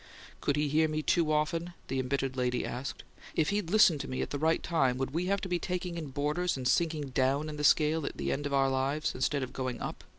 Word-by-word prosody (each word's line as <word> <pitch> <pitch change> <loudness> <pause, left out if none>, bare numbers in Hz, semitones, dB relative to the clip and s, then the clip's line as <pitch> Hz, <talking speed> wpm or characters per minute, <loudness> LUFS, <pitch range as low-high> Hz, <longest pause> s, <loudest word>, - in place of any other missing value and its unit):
"Could 140 - 0
he 150 0 +1
hear 155 +2 +3
me 155 0 -2
too 165 -2 +2
often?" 165 +3 0
the 135 - -1
embittered 135 0 -1
lady 125 -1 0
asked. 130 +3 -5 0.3
"If 160 +3 +2
he'd 205 -4 -1
listened 175 -7 +5
to 140 - -6
me 130 - -2
at - - -6
the 145 - -2
right 160 +2 +2
time, 135 -7 +1
would 135 0 -2
we 170 +5 -1
have 200 0 +1
to - - -3
be 175 -1 0
taking 180 -1 -3
in 165 -3 -4
boarders 150 +5 -1
and 130 -1 -2
sinking 155 -2 +1
DOWN 135 +4 +1
in 150 - -6
the 150 - -3
scale 155 +1 +4
at - - -6
the - - -1
end 145 +1 -1
of 140 - -5
our 135 -1 +3
lives, 135 +4 0
instead 135 +2 0
of 130 - -6
going 130 -2 -3
UP? - - -5
150 Hz, 255 wpm, -30 LUFS, 135-165 Hz, 0.3 s, listened